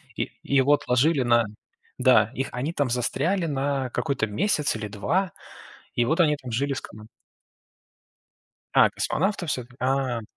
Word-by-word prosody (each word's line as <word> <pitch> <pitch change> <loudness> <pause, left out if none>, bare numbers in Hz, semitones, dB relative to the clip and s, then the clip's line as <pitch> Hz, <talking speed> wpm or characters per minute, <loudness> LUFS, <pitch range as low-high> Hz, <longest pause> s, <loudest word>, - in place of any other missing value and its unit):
И - - -3
и 140 - -2
его 140 +2 +5
отложили 140 +2 +2
на 120 -1 +4 0.5
да, 125 -4 +4
их 135 0 -2
они 130 +6 -2
там 145 -5 0
застряли 145 +9 0
на 140 -2 -1
какой-то 135 -3 -1
месяц 150 - 0
или 110 -1 -4
2, 170 - -1 0.6
и 120 - +2
вот 160 +7 +1
они 150 -3 +4
там 130 -3 -9
жили 140 +5 0
с - - -4
команд 110 0 -12 1.7
А, - - +7
космонавты 190 0 -1
всё-таки, 125 -3 -4
а. 130 -3 0
135 Hz, 150 wpm, -25 LUFS, 120-150 Hz, 1.7 s, А